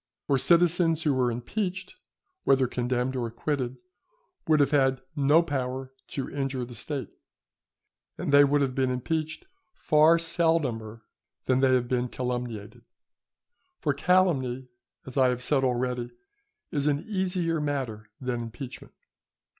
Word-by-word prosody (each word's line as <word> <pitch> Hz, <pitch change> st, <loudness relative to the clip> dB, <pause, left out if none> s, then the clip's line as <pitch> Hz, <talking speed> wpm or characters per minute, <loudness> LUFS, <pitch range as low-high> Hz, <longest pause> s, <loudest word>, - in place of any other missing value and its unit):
For 140 Hz, -2 st, +2 dB
citizens 170 Hz, 0 st, +3 dB
who 150 Hz, -, +2 dB
were 130 Hz, -2 st, +2 dB
impeached, 185 Hz, -, -3 dB, 0.5 s
whether 135 Hz, -1 st, +4 dB
condemned 125 Hz, +1 st, -1 dB
or 120 Hz, -2 st, -1 dB
acquitted, 125 Hz, +2 st, -3 dB, 0.7 s
would 155 Hz, -1 st, +4 dB
have 145 Hz, -, +3 dB
had 135 Hz, -3 st, +2 dB
no 145 Hz, +3 st, +4 dB
power 130 Hz, -3 st, -3 dB
to 135 Hz, -, -4 dB
injure 135 Hz, -3 st, -3 dB
the 120 Hz, -, -10 dB
State; 135 Hz, +5 st, -5 dB, 1.1 s
and -, -, -3 dB
they 145 Hz, 0 st, +9 dB
would 145 Hz, +1 st, +3 dB
have 135 Hz, -2 st, 0 dB
been 130 Hz, 0 st, +1 dB
impeached 155 Hz, -, -2 dB, 0.3 s
far 155 Hz, +2 st, +4 dB
seldomer 160 Hz, -10 st, 0 dB, 0.4 s
than 130 Hz, 0 st, +2 dB
they 130 Hz, -1 st, +4 dB
have 125 Hz, -1 st, 0 dB
been 125 Hz, 0 st, 0 dB
calumniated; 120 Hz, -4 st, -4 dB, 1.0 s
for 145 Hz, -, 0 dB
calumny, 140 Hz, -6 st, +1 dB, 0.4 s
as 130 Hz, -, -8 dB
I 130 Hz, -1 st, +5 dB
have 125 Hz, 0 st, -1 dB
said 135 Hz, 0 st, +2 dB
already, 125 Hz, -1 st, -1 dB, 0.6 s
is 145 Hz, -3 st, 0 dB
an 145 Hz, 0 st, +1 dB
easier 180 Hz, -5 st, -1 dB
matter 130 Hz, -8 st, -3 dB
than 125 Hz, -2 st, -2 dB
impeachment. 120 Hz, +3 st, -9 dB
135 Hz, 135 wpm, -27 LUFS, 125-155 Hz, 1.1 s, they